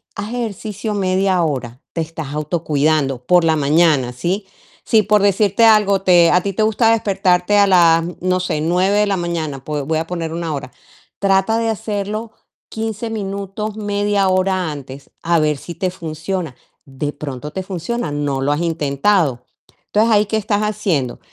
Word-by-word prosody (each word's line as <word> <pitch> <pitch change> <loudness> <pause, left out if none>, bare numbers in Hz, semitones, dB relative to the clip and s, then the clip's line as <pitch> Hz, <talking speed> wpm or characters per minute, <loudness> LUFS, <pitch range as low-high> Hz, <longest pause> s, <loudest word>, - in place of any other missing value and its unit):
Haz 205 +2 -5
ejercicio 215 -2 -4
media 185 -2 +1
hora, 130 -5 -3
te 165 - -1
estás 160 -3 -6
autocuidando 150 -4 0
por 175 +5 +4
la 160 -1 +3
mañana, 150 -3 +3
¿sí? 180 +11 -2 0.4
Si 220 -2 +4
por 210 0 +3
decirte 200 +2 +3
algo, 205 -3 +4
te 175 -3 +5
a 180 - +4
ti 195 +1 -3
te 215 - 0
gusta 220 +1 +3
despertarte 195 -3 +2
a 200 - +5
las, 165 -3 +5 0.2
no 185 0 +1
sé, 180 -4 -2
9 180 +5 +2
de 210 - +4
la 200 -2 0
mañana, 160 -6 -3
pues, 145 -2 -3
voy 160 +1 0
a 165 - -4
poner 165 -2 -4
1 165 -1 -3
hora. 135 -2 -6 0.5
Trata 195 +3 +2
de 230 - -1
hacerlo 215 0 -3 0.4
15 225 0 -4
minutos, 200 0 -4
media 205 -1 0
hora 185 -3 +1
antes, 140 -1 -10
a 170 0 +2
ver 150 -2 +1
si 170 +4 -9
te 185 +2 -2
funciona. 165 -2 -5 0.3
De 145 +2 -4
pronto 145 0 -7
te 190 - -4
funciona, 185 +1 -4
no 145 -2 -2
lo 140 +2 +1
has 150 - 0
intentado, 150 -3 +1 0.4
entonces, 220 +2 +2
ahí, 210 -1 +4
¿qué 220 +2 -1
estás 210 -1 0
haciendo? 200 - -1
180 Hz, 170 wpm, -18 LUFS, 155-205 Hz, 0.5 s, te